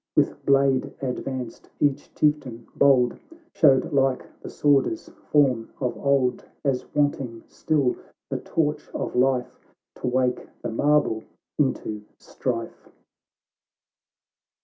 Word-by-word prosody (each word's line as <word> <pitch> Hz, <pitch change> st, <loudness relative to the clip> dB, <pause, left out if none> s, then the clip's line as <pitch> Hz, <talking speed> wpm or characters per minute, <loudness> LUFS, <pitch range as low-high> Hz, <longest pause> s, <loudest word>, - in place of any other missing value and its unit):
"With -, -, +1 dB
blade 135 Hz, -1 st, +3 dB
advanced, 130 Hz, -2 st, -5 dB
each 145 Hz, -2 st, 0 dB
Chieftain 145 Hz, -6 st, 0 dB
bold 130 Hz, -4 st, +4 dB, 0.3 s
Showed 140 Hz, -4 st, +4 dB
like 135 Hz, -2 st, +2 dB, 0.2 s
the -, -, -7 dB
Svvorder's 150 Hz, -, +1 dB, 0.2 s
form 130 Hz, -6 st, +3 dB
of 125 Hz, -3 st, -1 dB
old, 135 Hz, -3 st, +1 dB, 0.2 s
As 135 Hz, -2 st, 0 dB
wanting 135 Hz, -5 st, 0 dB
still 140 Hz, -5 st, 0 dB, 0.4 s
the -, -, -1 dB
torch 150 Hz, -2 st, -1 dB
of -, -, -3 dB
life, 125 Hz, 0 st, +1 dB, 0.4 s
To -, -, -4 dB
wake 125 Hz, 0 st, 0 dB, 0.2 s
the 120 Hz, -, -2 dB
marble 145 Hz, -3 st, +2 dB, 0.4 s
into 110 Hz, -6 st, 0 dB, 0.2 s
strife. -, -, -5 dB
135 Hz, 105 wpm, -25 LUFS, 125-145 Hz, 0.4 s, bold